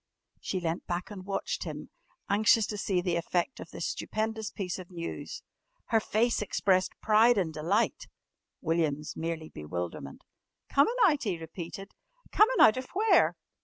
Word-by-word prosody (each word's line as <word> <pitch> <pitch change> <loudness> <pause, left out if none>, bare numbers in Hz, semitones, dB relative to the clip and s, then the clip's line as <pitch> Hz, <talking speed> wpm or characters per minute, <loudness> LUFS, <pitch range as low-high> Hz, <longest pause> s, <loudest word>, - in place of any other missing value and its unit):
She 185 - -3
leant 170 0 -3
back 175 +3 -3
and 190 -2 -9
watched 195 -1 -2
him, - - -7 0.4
anxious 215 +2 +4
to 210 - -5
see 190 -2 0
the 175 -2 0
effect 175 +7 -1
of - - -9
this - - -5
stupendous 220 - -3
piece 185 -2 -4
of 180 - -10
news. 170 -2 -6 0.5
Her 225 - +4
face 225 +2 +1
expressed 190 -2 +1
pride 225 +2 +5
and 170 -5 0
delight, 190 +10 0 0.5
William's 155 -3 -1
merely 160 -1 -4
bewilderment. 75 -2 -6 0.5
"Comin' 290 - +4
out?" 300 -7 +3
he 195 -7 -1
repeated. 170 +4 -8 0.4
"Comin' 455 +4 +4
out 215 - +7
of 255 0 -4
where?" 430 +3 +4
190 Hz, 150 wpm, -29 LUFS, 170-220 Hz, 0.5 s, out